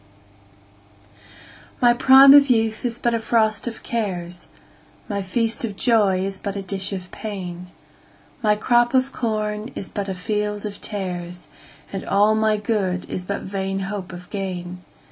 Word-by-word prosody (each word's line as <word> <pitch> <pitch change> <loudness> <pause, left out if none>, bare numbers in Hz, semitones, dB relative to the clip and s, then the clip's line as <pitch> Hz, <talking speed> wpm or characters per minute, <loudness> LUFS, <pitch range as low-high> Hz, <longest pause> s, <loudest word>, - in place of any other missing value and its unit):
1My 240 -1 +5
prime 270 +1 +9
of 285 -1 +7
youth 225 -2 +1
is 240 -2 -1
but 235 -1 0
a 230 - +1
frost 220 -1 +1
of 230 - -6
cares,2My 195 0 -6
feast 225 +5 -1
of 215 -3 -3
joy 200 -5 +2
is 195 0 -5
but 200 0 -4
a 200 - -4
dish 195 +1 -3
of 185 -2 -6
pain,3My 195 +2 -5
crop 240 +2 +3
of 260 +1 +2
corn 215 -2 -2
is 195 - -5
but 200 -1 -4
a 190 - -3
field 210 +2 -2
of 205 -1 -6
tares,4And 180 0 -7
all 205 +2 +4
my 220 0 +2
good 200 -4 -1
is 180 - -4
but 200 +2 -4
vain 195 0 -3
hope 195 -1 -5
of 180 0 -10
gain. 180 -3 -5
205 Hz, 145 wpm, -22 LUFS, 190-225 Hz, -, prime